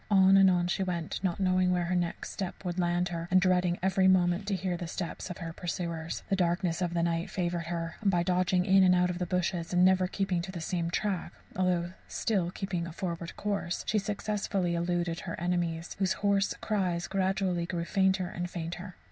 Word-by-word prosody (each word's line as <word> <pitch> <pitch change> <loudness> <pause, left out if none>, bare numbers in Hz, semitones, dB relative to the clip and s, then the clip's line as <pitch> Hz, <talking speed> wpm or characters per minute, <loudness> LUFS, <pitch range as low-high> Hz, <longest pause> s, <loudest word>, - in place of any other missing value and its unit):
On 195 -1 +6
and 195 -1 +7
on 175 -1 +2
she 180 - -1
went, 175 -2 -3
not 180 -1 0
knowing 185 -1 +3
where 180 -1 +1
her 180 +2 0
next 175 -1 -2
step 190 0 -5
would 175 0 -2
land 175 0 +1
her, 170 -1 -4
and 185 - +5
dreading 180 -1 +2
every 190 0 +3
moment 185 +1 +3
to 200 - +1
hear 185 -1 -2
the 175 0 -5
steps 175 +2 -5
of 180 - -6
her 165 -2 -6
pursuers. 170 -2 -4
The 195 - +1
darkness 175 -1 0
of 175 -1 -1
the 170 - +2
night 170 0 0
favoured 175 -2 -2
her, 165 -1 -4
and 205 - +2
by 175 -2 +2
dodging 180 0 +2
in 195 -1 +5
and 180 -1 +5
out 180 0 +2
the 180 - -1
bushes 175 -1 -1
and 180 +1 +5
never 185 0 +4
keeping 185 -2 -1
to 185 +2 -6
the 180 - -6
same 170 0 -2
track, 195 0 -2 0.2
although 180 -1 0
still 190 -6 0
keeping 180 -2 -3
a - - -7
forward 170 -1 -5
course, 200 -4 -2
she 215 - +2
successfully 200 -3 -1
eluded 170 0 -1
her 170 - -6
enemies, 175 -1 -1
whose 190 -1 +2
hoarse 200 -1 +1
cries 185 -5 -1
gradually 190 -2 0
grew 170 -2 -2
fainter 190 0 +2
and 175 0 -4
fainter. 175 +2 -6
180 Hz, 205 wpm, -30 LUFS, 170-190 Hz, 0.2 s, and